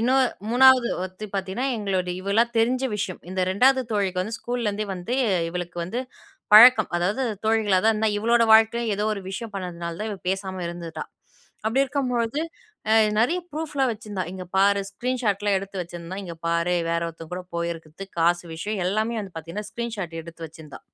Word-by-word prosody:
இன்னும் 260 +3 +4 0.3
3வது 255 0 +6
ஒருத்தி 185 +3 -6
பார்த்தீங்கன்னா 195 +6 -2
எங்களோட 195 -4 -1
இவளா 200 +4 +3
தெரிஞ்ச 250 +3 +2
விஷயம். 185 -3 -3
இந்த 185 - -2
2வது 260 +7 +4
தோழிக்கு 195 -4 0
வந்து 220 +4 -4
ஸ்கூல்லேருந்தே 220 -4 -2
வந்து 180 +7 -4 0.3
இவளுக்கு 175 0 -5
வந்து 185 +8 -4 0.5
பழக்கம். 220 0 +9
அதாவது 190 +9 0 0.2
தோழிகளா 215 -3 +3
தான் 225 - +6
இருந்தா 215 0 +1
இவளோட 235 +2 +3
வாழ்க்கையிலயும் 225 +1 +4
ஏதோ 210 - -1
ஒரு 200 - -7
விஷயம் 220 +2 -6
பண்ணதுனால 170 -3 -5
தான். 215 +1 -2
இவ 205 - -4
பேசாம 190 -1 -2
இருந்துட்டா. 170 -1 -6 0.6
அப்படி 250 +5 +2
இருக்கும்பொழுது 250 -1 -1 0.5
அ - - +6 0.3
நெறைய 335 +11 +2
ப்ரூஃப்லாம் 295 -4 -1
வச்சிருந்தா. 205 -4 -5
இங்க 185 -1 -6
பாரு 200 +1 +4
ஸ்க்ரீன் 250 +5 -3
ஷாட்லாம் 205 -2 +1
எடுத்து 195 -1 -6
வச்சிருந்தா. 175 +1 -8
இங்க 170 -2 -7
பாரு 170 +1 +1
வேற 170 0 +1
ஒருத்தங்க 165 +1 -12
கூட 180 0 -6
போயிருக்கறது, 170 +2 -5
காசு 175 +1 +3
விஷயம் 200 +4 -3
எல்லாமே 220 +4 0
வந்து 195 -3 -9
பார்த்தீங்கன்னா, 170 +6 -6
ஸ்க்ரீன் 235 -1 -4
ஷாட் 170 -4 -4
எடுத்து 165 0 -10
வச்சிருந்தா. 155 -2 -12
200 Hz, 165 wpm, -24 LUFS, 180-230 Hz, 0.6 s, பழக்கம்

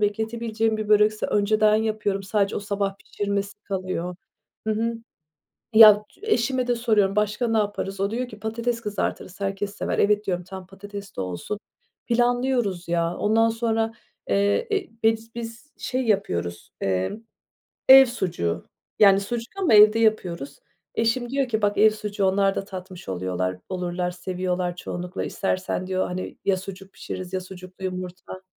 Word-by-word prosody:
bekletebileceğim 220 +1 0
bir 215 -1 -4
börekse 210 0 +4
önceden 210 +1 +3
yapıyorum. 215 -3 -1
Sadece 200 +1 0
o - - -2
sabah 200 -1 -2
pişirmesi 200 0 -3
kalıyor. 185 -2 -3 0.5
Hı 220 - +2
hı. 230 +2 -1 0.8
Ya 215 -1 +9 0.2
eşime 255 - +1
de 245 - +2
soruyorum, 215 -4 +2
"Başka 210 +3 +1
ne 225 -1 +1
yaparız?" 205 -2 -2
O 200 +1 0
diyor 245 +2 -2
ki: 215 - -11
"Patates 230 +2 -2
kızartırız, 205 -2 -4
herkes 200 +1 -2
sever," - - -2
"Evet." 210 +1 +3
diyorum, 180 -2 -1
"Tamam, 190 0 -9
patates 200 0 -9
de - - -1
olsun," 90 - -4 0.5
planlıyoruz, 240 -6 +1
ya. 170 0 0
Ondan 225 +2 +3
sonra, 225 -1 0 0.4
eee, 200 - +2
eee, 395 -3 0
biz 225 +1 +1
biz, 235 +5 -8
şey, 255 0 -2
yapıyoruz, 85 - -1
eee, 95 -1 0 0.8
ev 265 0 +11
sucuğu 175 - -2 0.3
yani 195 -2 +7
sucuk 230 +3 -4
ama 335 - +4
evde 210 +1 +8
yapıyoruz. 175 -10 0 0.3
Eşim 235 +2 +1
diyor 275 -1 0
ki: 220 -2 -1
"Bak 205 0 +1
ev 220 +1 +7
sucuğu, 210 -1 -3
onlar 195 +1 +2
da - - -3
tatmış 185 - -9
oluyorlar, 90 0 -2
olurlar, 180 -1 -2
seviyorlar 180 0 -2
çoğunlukla 180 +1 -5
istersen." 185 -1 -2
diyor, 185 0 0
hani, 180 +1 -5
ya 195 - +3
sucuk 195 +1 -9
pişiririz 185 0 -7
ya 185 - -1
sucuklu 185 0 -11
yumurta. 185 0 -6
205 Hz, 150 wpm, -24 LUFS, 185-225 Hz, 0.8 s, ev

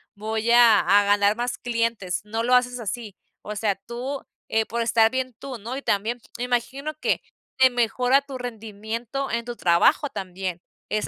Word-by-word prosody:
voy 220 +2 -2
a 235 -2 +7
a 205 +1 +4
ganar 205 +1 +3
más 245 +1 -3
clientes", 230 -6 -1
no 225 +2 -2
lo 245 +2 +3
haces 250 0 +2
así, 220 -1 -5 0.3
o 210 - -6
sea, 205 -1 0
tú, 245 +7 -6 0.3
eh, 220 0 +2
por 235 +1 -3
estar 225 -1 +4
bien 255 -2 -2
tú, 260 -3 -7
¿no? 235 +5 -5
Y 275 - -7
también, 220 +5 0 0.2
imagino 250 +5 -2
que - - 0 0.4
te 260 0 +7
mejora 250 +2 +2
tu 270 -2 -8
rendimiento 230 +2 -5
en 235 0 -2
tu 240 0 -5
trabajo 180 - +3
también, 185 -4 -5 0.3
es 215 0 -1
230 Hz, 175 wpm, -24 LUFS, 210-250 Hz, 0.4 s, a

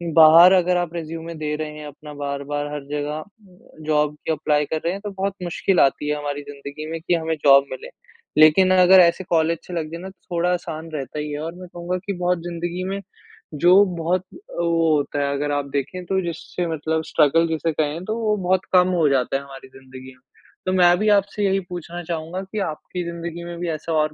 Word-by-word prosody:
बाहर 165 +3 +9
अगर 180 -1 +3
आप 175 -2 -2
रेज़्यूमे 165 0 -6
दे 150 -1 -3
रहे 155 0 -4
हैं, 150 - -8
अपना 150 +1 -11
बार-बार 145 0 -4
हर 145 - -5
ज़गह, 150 +1 -3 0.6
जॉब 150 -1 +1
के 160 - +1
एप्लाई 150 -1 +1
कर 160 - -2
रहे 170 - +1
हैं, 200 - -6
तो 205 -1 -5
बहुत 195 0 -2
मुश्किल 180 +1 0
आती 140 +2 +2
है 150 - 0
हमारी 145 -1 -4
ज़िंदगी 140 +2 -8
में, 165 - -3
कि 175 - 0
हमें 160 -1 0
जॉब 140 0 +7
मिले। 480 +4 -7 0.5
लेकिन 170 +5 +6
अगर 185 +1 +7
ऐसे 175 +2 +4
कॉलेज 165 0 +2
से 180 - -8
लग 160 -2 -3
जाए 170 +1 -6
ना, 190 - -7
तो 190 - -19 0.2
थोड़ा 175 +1 +1
आसान 165 -2 -5
रहता 140 0 -5
ही 150 0 -4
है 145 - -4
और 165 +2 -5
मैं 180 0 -10
कहूँगा 175 +1 -3
की 200 - -2
बहुत 180 0 0
ज़िंदगी 175 +1 -4
में, 195 +1 -3 0.5
जो 175 +6 +6
बहुत 170 +2 0 0.4
ओ, 165 -2 +2
होता 145 0 -2
है, 140 0 0
अगर 145 +1 -2
आप 145 -1 -1
देखें 145 +7 -3
तो 190 +2 0
जिससे 170 0 -4
मतलब 160 0 -2
स्ट्रगल 165 +2 +3
जिसे 160 0 -1
कहें, 155 +2 -2
तो 220 +2 -2
वो 215 -2 +1
बहुत 185 0 +2
कम 180 0 +6
हो 160 - +3
जाता 135 0 +1
है - - -7
हमारी 135 -1 -12
ज़िंदगी 130 0 -13
में, 130 - -29 0.4
तो 185 - 0
मैं 175 -1 +5
भी 215 - +2
आपसे 200 +1 -1
यही 195 0 +2
पूछना 175 0 -6
चाहूँगा 165 +2 -4
कि 200 +3 -6
आपकी 175 +3 -6
ज़िंदगी 170 0 -6
में 175 0 -7
भी 175 -1 -2
ऐसा 160 +1 -3
और 155 0 0
165 Hz, 220 wpm, -22 LUFS, 150-180 Hz, 0.6 s, बाहर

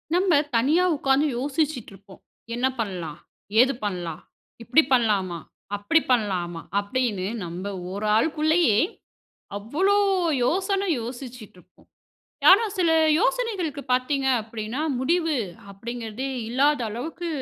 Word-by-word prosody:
நம்ம 360 -5 +4 0.2
தனியா 290 +10 +3
உட்கார்ந்து 275 +1 +2
யோசிச்சிட்டு 280 -2 -2
இருப்போம். 195 0 -16 0.3
"என்ன 245 +2 0
பண்ணலாம், 175 -7 -4 0.4
ஏது 265 +2 +3
பண்ணலாம், 175 -6 -4 0.4
இப்டி 260 +8 +4
பண்ணலாமா, 200 -8 +1 0.4
அப்டி 205 +11 +2
பண்ணலாமா?" 180 -8 0 0.2
அப்டினு 205 -3 -1 0.2
நம்ம 175 +3 -6 0.3
ஒரு 205 +2 -3
ஆளுக்குள்ளேயே 310 -1 +3 0.8
அவ்ளோ 325 - +1 0.5
யோசன 390 - 0 0.2
யோசிச்சிட்டு 245 -3 -8
இருப்போம். 180 +1 -23 0.6
ஆனா, 395 +5 +7
சில 350 -4 +2 0.3
யோசனைகளுக்கு 410 - -1
பாத்தீங்க, 265 +2 +1
அப்டின்னா 220 +3 -6 0.2
முடிவு, 325 +3 +1 0.4
அப்படிங்கறதே 230 +4 -6 0.2
இல்லாத 285 +4 +2
அளவுக்கு 310 +10 -5
250 Hz, 105 wpm, -24 LUFS, 205-310 Hz, 0.8 s, ஆனா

